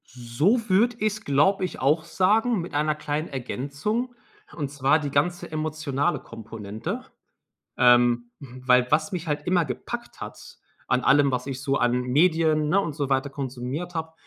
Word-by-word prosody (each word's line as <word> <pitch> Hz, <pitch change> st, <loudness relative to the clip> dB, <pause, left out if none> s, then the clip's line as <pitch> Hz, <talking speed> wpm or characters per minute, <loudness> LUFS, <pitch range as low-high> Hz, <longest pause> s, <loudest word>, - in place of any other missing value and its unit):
So 145 Hz, -, 0 dB
würde 220 Hz, +6 st, +3 dB
ich's, 215 Hz, 0 st, -1 dB
glaube 150 Hz, +8 st, +2 dB
ich, -, -, -7 dB
auch 150 Hz, +5 st, +2 dB
sagen 215 Hz, +6 st, +2 dB
mit 170 Hz, -, -8 dB
einer 150 Hz, +1 st, +1 dB
kleinen 150 Hz, +1 st, -3 dB
Ergänzung, 145 Hz, -, -3 dB, 0.4 s
und 145 Hz, -4 st, -3 dB
zwar 145 Hz, +2 st, +2 dB
die 145 Hz, -2 st, -4 dB
ganze 175 Hz, +6 st, 0 dB
emotionale 155 Hz, -1 st, -1 dB
Komponente. 110 Hz, -2 st, -7 dB, 0.7 s
Ähm, 120 Hz, -1 st, +4 dB
hm, 130 Hz, -2 st, -11 dB
weil 125 Hz, -1 st, +5 dB
was 155 Hz, +1 st, +2 dB
mich 180 Hz, -2 st, -4 dB
halt 150 Hz, -1 st, -2 dB
immer 175 Hz, -2 st, +3 dB
gepackt 125 Hz, -4 st, -6 dB
hat -, -, -9 dB, 0.3 s
an 125 Hz, -, +2 dB
allem, 140 Hz, +2 st, +4 dB
was 125 Hz, +1 st, -2 dB
ich 135 Hz, -1 st, -5 dB
so 135 Hz, 0 st, 0 dB
an 125 Hz, +1 st, +1 dB
Medien, 155 Hz, +3 st, +2 dB
ne, 195 Hz, -, +4 dB
und 160 Hz, -7 st, -3 dB
so 145 Hz, -3 st, -2 dB
weiter 135 Hz, +1 st, +1 dB
konsumiert 135 Hz, +5 st, -5 dB
habe, 160 Hz, 0 st, -4 dB
145 Hz, 165 wpm, -25 LUFS, 130-170 Hz, 0.7 s, weil